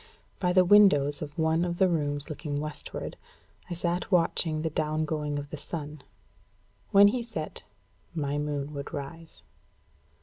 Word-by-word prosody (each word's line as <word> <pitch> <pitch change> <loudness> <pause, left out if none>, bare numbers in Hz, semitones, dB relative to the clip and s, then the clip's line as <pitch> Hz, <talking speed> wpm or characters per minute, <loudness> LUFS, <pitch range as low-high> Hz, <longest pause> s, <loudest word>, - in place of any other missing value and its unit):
By 180 -2 +1
the 185 0 +5
windows 175 -8 +5
of 145 -1 -7
one 160 +1 +2
of 175 -1 -2
the 190 - +5
rooms 145 -4 -1
looking 150 -2 -4
westward, 150 0 -5 0.5
I 175 - -3
sat 175 +3 -2
watching 165 -3 +2
the 160 - -1
down 155 0 0
going 150 -2 -2
of 145 0 -6
the 155 - -5
sun. 150 0 -6 0.9
When 200 +1 +7
he 245 +3 -1
set, 215 -10 -6 0.5
my 145 -2 -1
moon 145 0 -3
would 140 -1 -6
rise. 160 +4 -8
155 Hz, 155 wpm, -28 LUFS, 145-175 Hz, 0.9 s, When